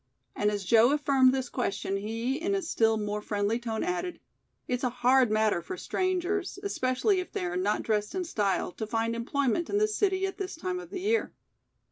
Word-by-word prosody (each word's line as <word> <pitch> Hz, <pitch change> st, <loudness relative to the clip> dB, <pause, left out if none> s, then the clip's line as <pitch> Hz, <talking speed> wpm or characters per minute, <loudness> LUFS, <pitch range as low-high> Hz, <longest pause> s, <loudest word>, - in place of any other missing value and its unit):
And 210 Hz, -, +2 dB
as 205 Hz, -1 st, -2 dB
Joe 230 Hz, +4 st, +6 dB
affirmed 275 Hz, -3 st, +4 dB
this 260 Hz, -1 st, -1 dB
question 200 Hz, -5 st, -2 dB
he 225 Hz, +6 st, -2 dB
in 395 Hz, +3 st, 0 dB
a 390 Hz, -, -1 dB
still 225 Hz, -8 st, +2 dB
more 210 Hz, 0 st, -2 dB
friendly 205 Hz, +2 st, -1 dB
tone 225 Hz, -2 st, -3 dB
added: 360 Hz, 0 st, -2 dB, 0.5 s
"It's 250 Hz, +1 st, -2 dB
a 250 Hz, -, +2 dB
hard 250 Hz, +1 st, +3 dB
matter 215 Hz, -4 st, +2 dB
for 370 Hz, -, -6 dB
strangers, 370 Hz, +1 st, -1 dB
expecially 375 Hz, -, +1 dB
if 365 Hz, -, -5 dB
they 180 Hz, -, -3 dB
are 175 Hz, 0 st, -3 dB
not 200 Hz, +4 st, 0 dB
dressed 210 Hz, -, -1 dB
in 375 Hz, -, -1 dB
style, 205 Hz, -, 0 dB
to 220 Hz, +4 st, -5 dB
find 230 Hz, +1 st, -1 dB
employment 275 Hz, +6 st, 0 dB
in 405 Hz, -, +1 dB
this 430 Hz, +1 st, +2 dB
city 385 Hz, -1 st, +1 dB
at 385 Hz, -, -5 dB
this 385 Hz, -1 st, -4 dB
time 360 Hz, +2 st, -3 dB
of 360 Hz, -2 st, -10 dB
the 380 Hz, -1 st, -5 dB
year." 440 Hz, +4 st, +1 dB
255 Hz, 200 wpm, -28 LUFS, 220-365 Hz, 0.5 s, Joe